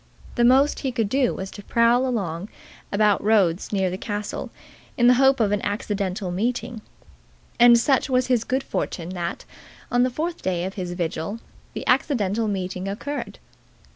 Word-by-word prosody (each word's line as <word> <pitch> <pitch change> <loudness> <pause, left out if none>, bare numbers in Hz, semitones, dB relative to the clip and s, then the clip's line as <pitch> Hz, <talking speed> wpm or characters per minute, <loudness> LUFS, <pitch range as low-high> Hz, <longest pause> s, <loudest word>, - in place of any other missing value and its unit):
The 240 - +1
most 265 +4 +4
he 265 - -2
could 225 -4 -1
do 260 0 +1
was 190 0 -6
to 205 - -10
prowl 235 +4 +3 0.8
about 210 -1 +2
roads 200 -5 +2
near 190 -3 0
the 185 - -5
castle 205 -1 -4 0.5
in 240 - +3
the 245 - +7
hope 270 +1 +4
of 210 -3 +2
an 205 -1 0
accidental 200 -2 -2
meeting. 230 +3 -2 0.8
And 240 0 +8
such 265 +3 +2
was 255 -1 +2
his 250 -3 +1
good 260 +3 -1
fortune 170 -1 -4
that, 175 -2 -4 0.5
on 245 - +3
the 255 - +3
fourth 330 +7 -4
day 180 -1 -1
of 190 - -4
his 180 -3 -5
vigil, 175 +4 -3 0.3
the - - -6
accidental 230 -5 +1
meeting 185 -1 -3
occurred. 285 +9 -5
215 Hz, 165 wpm, -23 LUFS, 190-250 Hz, 0.8 s, And